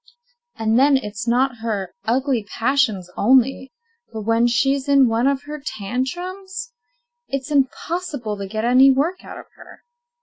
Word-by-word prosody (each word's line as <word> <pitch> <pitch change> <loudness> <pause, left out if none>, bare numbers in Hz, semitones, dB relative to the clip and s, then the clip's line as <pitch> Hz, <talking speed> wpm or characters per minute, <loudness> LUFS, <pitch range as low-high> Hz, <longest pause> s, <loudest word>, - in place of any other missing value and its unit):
And 225 +1 +2
then 275 0 +5
it's 215 -1 -6
not 250 +1 +1
her 205 -5 -3
ugly 255 0 0
passions 225 -5 0
only, 260 +3 +2 0.4
but 220 -2 -6
when 230 +2 +2
she's 270 +4 +1
in 275 -2 +5
one 230 +3 +1
of 275 0 0
her 300 0 -8
tantrums, 365 - -5 0.5
it's 275 +1 -4
impossible 285 -3 -1
to 200 -1 -5
get 215 +3 -3
any 255 +3 +6
work 300 +8 0
out - - -9
of - - -11
her. - - -15
260 Hz, 145 wpm, -21 LUFS, 225-280 Hz, 0.5 s, any